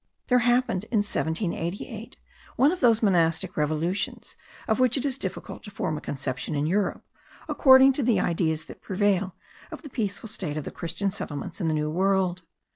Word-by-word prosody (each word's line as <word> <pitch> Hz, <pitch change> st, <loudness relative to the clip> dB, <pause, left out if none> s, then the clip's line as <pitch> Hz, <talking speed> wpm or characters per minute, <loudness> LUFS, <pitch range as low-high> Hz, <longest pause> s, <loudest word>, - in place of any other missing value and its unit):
There 250 Hz, -1 st, +5 dB
happened 240 Hz, -5 st, +1 dB
in 220 Hz, -2 st, +1 dB
1788 195 Hz, +5 st, -3 dB, 0.4 s
one 280 Hz, +4 st, +4 dB
of 365 Hz, -, -3 dB
those 230 Hz, -2 st, +4 dB
monastic 180 Hz, -1 st, +2 dB
revolutions, 155 Hz, +5 st, -2 dB, 0.3 s
of 220 Hz, +2 st, +1 dB
which 255 Hz, 0 st, +3 dB
it 270 Hz, -, -1 dB
is 270 Hz, -3 st, 0 dB
difficult 190 Hz, -8 st, -5 dB
to -, -, -9 dB
form 175 Hz, -5 st, -2 dB
a 150 Hz, -, -5 dB
conception 135 Hz, +1 st, -3 dB
in 145 Hz, +1 st, 0 dB
Europe, 195 Hz, +5 st, 0 dB, 0.4 s
according 265 Hz, -1 st, +7 dB
to 280 Hz, -, -2 dB
the 240 Hz, -3 st, +3 dB
ideas 160 Hz, -2 st, 0 dB
that -, -, -12 dB
prevail 195 Hz, -1 st, 0 dB, 0.3 s
of -, -, -9 dB
the 290 Hz, -, -10 dB
peaceful 210 Hz, -2 st, -3 dB
state 180 Hz, -8 st, -4 dB
of 155 Hz, -, -3 dB
the -, -, -6 dB
Christian 180 Hz, +4 st, -3 dB
settlements 155 Hz, -1 st, -5 dB
in 165 Hz, -, 0 dB
the 155 Hz, -, +1 dB
New 150 Hz, 0 st, -1 dB
World. 185 Hz, 0 st, +1 dB
190 Hz, 180 wpm, -26 LUFS, 165-230 Hz, 0.4 s, according